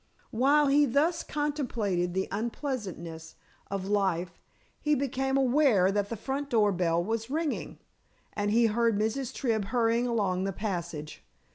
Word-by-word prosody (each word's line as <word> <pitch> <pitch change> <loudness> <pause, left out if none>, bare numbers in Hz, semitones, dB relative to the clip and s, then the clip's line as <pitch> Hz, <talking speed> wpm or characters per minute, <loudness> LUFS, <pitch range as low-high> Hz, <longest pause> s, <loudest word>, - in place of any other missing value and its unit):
While 280 +6 +4
he 285 +1 +4
thus 305 +7 +2
contemplated 230 - -2
the 190 - 0
unpleasantness 200 - -4 0.3
of 195 -1 -3
life 185 -4 0 0.4
he 300 0 +2
became 270 0 0
aware 255 -8 +4
that 205 0 -1
the 230 - -4
front 275 +6 -3
door 215 -4 +3
bell 170 -2 +1
was 225 +3 -3
ringing, 310 +1 -2 0.6
and 205 -1 -1
he 230 +2 +4
heard 230 0 +2
Mrs. 225 +5 -1
Tribb 225 -5 -1
hurrying 235 +1 +1
along 200 -6 0
the 195 - -2
passage. 170 - -5
225 Hz, 140 wpm, -29 LUFS, 190-270 Hz, 0.6 s, While